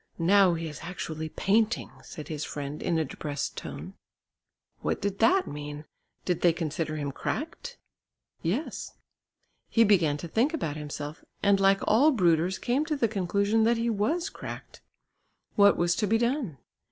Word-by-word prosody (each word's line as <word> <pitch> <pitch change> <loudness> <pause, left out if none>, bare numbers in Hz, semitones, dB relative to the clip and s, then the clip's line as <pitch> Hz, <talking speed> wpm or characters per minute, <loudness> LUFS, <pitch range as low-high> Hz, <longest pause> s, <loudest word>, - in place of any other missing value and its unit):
"Now 185 +1 +5
he 165 0 -4
is 150 - -8
actually 160 -2 -5
painting," 220 +7 +1
said 155 -4 -9
his 155 -2 -4
friend 145 0 -5
in 170 - 0
a 160 - +1
depressed 145 +1 -4
tone. - - -7 0.9
What - - -1
did 200 0 -3
that 365 +11 +4
mean? 145 +1 -7 0.4
Did 180 -2 0
they 175 -2 +5
consider 160 -1 -3
him 145 -2 -3
cracked? 305 - -4 0.6
Yes. 210 - -3 0.8
He 230 - +5
began 175 -9 +3
to 160 - -6
think 245 - +1
about 160 - -3
himself, 150 0 -6 0.2
and 200 -1 +4
like 195 0 +4
all 250 +9 +5
brooders 180 - +2
came 255 +4 0
to 310 -1 -1
the 245 -5 +2
conclusion 200 +2 +1
that 235 +1 +3
he 230 0 0
was 285 - 0
cracked. - - -9 0.7
What 200 -1 +6
was 175 0 +2
to 210 - +1
be 225 +3 +3
done? 235 - -1
185 Hz, 160 wpm, -28 LUFS, 155-225 Hz, 0.9 s, What